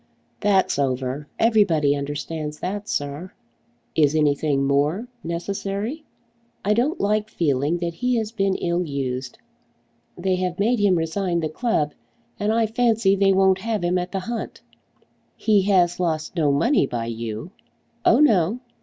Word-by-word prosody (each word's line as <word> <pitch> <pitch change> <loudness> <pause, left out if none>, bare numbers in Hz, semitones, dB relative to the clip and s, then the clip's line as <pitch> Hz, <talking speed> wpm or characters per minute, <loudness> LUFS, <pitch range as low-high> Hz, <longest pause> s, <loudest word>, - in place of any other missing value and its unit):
"That's 195 -7 +2
over. 135 +1 -1
Everybody 180 -11 +3
understands 150 +2 -4
that, 205 +3 -4
sir." 145 -1 -3 0.6
"Is 150 -1 +3
anything 145 -2 +2
more 145 - +1 0.2
necessary?" 200 - -4 0.6
"I 210 - +3
don't 260 - 0
like 210 +1 0
feeling 150 -3 0
that 170 -1 -3
he 250 +8 0
has 220 -2 -1
been 195 -4 0
ill 175 +1 0
used. 130 -4 -4 0.8
They 185 +1 0
have 180 -1 -2
made 230 +4 +2
him 200 -3 +4
resign 170 +1 -1
the 155 - -2
club, 155 -7 0 0.5
and 210 +1 +1
I 225 0 +2
fancy 225 -3 +2
they 195 0 +3
won't 190 0 +4
have 220 -1 -2
him 180 +1 +1
at 180 0 -4
the 195 - -2
hunt." 230 +3 -5 0.7
"He 210 -2 +3
has 175 -3 +3
lost 165 -1 -2
no 155 -4 +2
money 145 - +2
by 115 -3 -3
you?" 115 +6 -5 0.5
"Oh - - +5
no." 220 - +3
180 Hz, 145 wpm, -23 LUFS, 150-210 Hz, 0.8 s, Oh